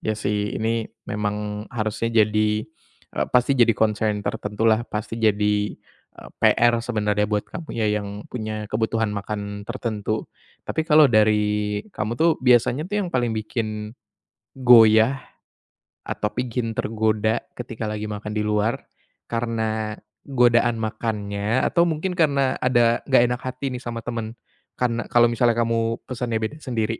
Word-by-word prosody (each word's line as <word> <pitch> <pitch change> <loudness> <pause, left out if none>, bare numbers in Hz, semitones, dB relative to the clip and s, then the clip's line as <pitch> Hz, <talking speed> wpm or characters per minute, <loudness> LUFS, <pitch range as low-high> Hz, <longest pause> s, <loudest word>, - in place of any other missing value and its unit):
Ya, 110 0 -2
sih, 105 -1 -2
ini 115 0 -1 0.2
memang 105 0 -3
harusnya 110 0 -2 0.2
jadi 105 0 0 0.5
e - - -5
pasti 125 +2 +4
jadi 120 -1 +6
concern 105 -1 +1
tertentulah, 110 +2 0
pasti 110 +2 -4
jadi, 105 -1 +1 0.4
e - - -12 0.2
PR 120 0 +4
sebenarnya 105 -3 0
buat 105 -1 0
kamu 165 - -9
ya 110 -2 +1
yang 100 +1 -7
punya 110 -3 -4
kebutuhan 110 0 0
makan 100 0 -5
tertentu. 110 -3 -3 0.4
Tapi - - -2
kalau 150 0 +7
dari 105 -1 +2
kamu 110 - -3
tuh 165 +6 +4
biasanya 125 +5 +3
tuh 205 - -2
yang - - -4
paling 120 -3 +1
bikin 110 -1 -4 0.6
goyah 120 0 +6 0.8
atau 105 - -2
bikin 120 -2 -3
tergoda 110 0 0 0.2
ketika 115 -2 -5
lagi 105 0 -4
makan 105 +1 -5
di 105 - 0
luar, 105 +2 +1 0.6
karena 110 -2 -2 0.3
godaan 120 -3 +3
makannya 110 +1 -2
atau 170 0 +3
mungkin 165 +3 -2
karena 140 -4 +2
ada 120 -2 +3
gak 130 -3 +5
enak 125 - -3
hati 130 +1 -4
nih 125 - -4
sama 115 -1 -5
temen? 115 -1 -5 0.4
Kan 120 -2 -1
kalau 120 -1 +4
misalnya 120 0 +2
kamu 115 -1 0
pesennya 125 -2 -4
beda 150 +8 -4
sendiri? 115 -5 -2
110 Hz, 140 wpm, -23 LUFS, 105-120 Hz, 0.8 s, kalau